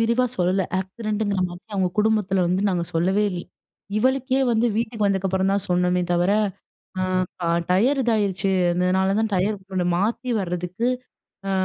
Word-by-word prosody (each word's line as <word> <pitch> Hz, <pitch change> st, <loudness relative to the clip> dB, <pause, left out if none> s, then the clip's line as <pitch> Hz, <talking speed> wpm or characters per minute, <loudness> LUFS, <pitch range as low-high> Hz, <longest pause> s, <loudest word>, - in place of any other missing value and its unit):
விரிவா 235 Hz, +2 st, +2 dB
சொல்லல. 185 Hz, +2 st, +1 dB, 0.2 s
ஆக்சிடென்ட்டுங்கிற 205 Hz, 0 st, -2 dB
மாதிரி 175 Hz, +1 st, -11 dB
அவங்க 190 Hz, -2 st, +1 dB
குடும்பத்தில 210 Hz, -3 st, +2 dB
வந்து 185 Hz, +3 st, +1 dB
நாங்க 175 Hz, -2 st, 0 dB
சொல்லவே 190 Hz, +5 st, +2 dB
இல் 175 Hz, -2 st, -4 dB, 0.6 s
இவளுக்கே 260 Hz, +2 st, +1 dB
வந்து 230 Hz, +1 st, +2 dB
வீட்டுக்கு 225 Hz, -2 st, -1 dB
வந்ததுக்கப்புறம் 190 Hz, -1 st, +1 dB
தான் 200 Hz, -1 st, 0 dB
சொன்னோமே 180 Hz, 0 st, +2 dB
தவிர, 175 Hz, +2 st, +2 dB, 0.7 s
அ -, -, 0 dB, 0.4 s
ப -, -, -6 dB, 0.3 s
டயர் 250 Hz, +10 st, +3 dB
இதாயிருச்சு. 205 Hz, -5 st, +1 dB, 0.2 s
அதனால 185 Hz, +2 st, +1 dB
தான் 220 Hz, -, 0 dB
டயர் 200 Hz, +3 st, +1 dB, 0.4 s
மாத்தி 235 Hz, +5 st, -1 dB
வரதுக்கு 180 Hz, +5 st, -2 dB, 0.6 s
அ -, -, 0 dB
195 Hz, 140 wpm, -23 LUFS, 180-220 Hz, 0.7 s, டயர்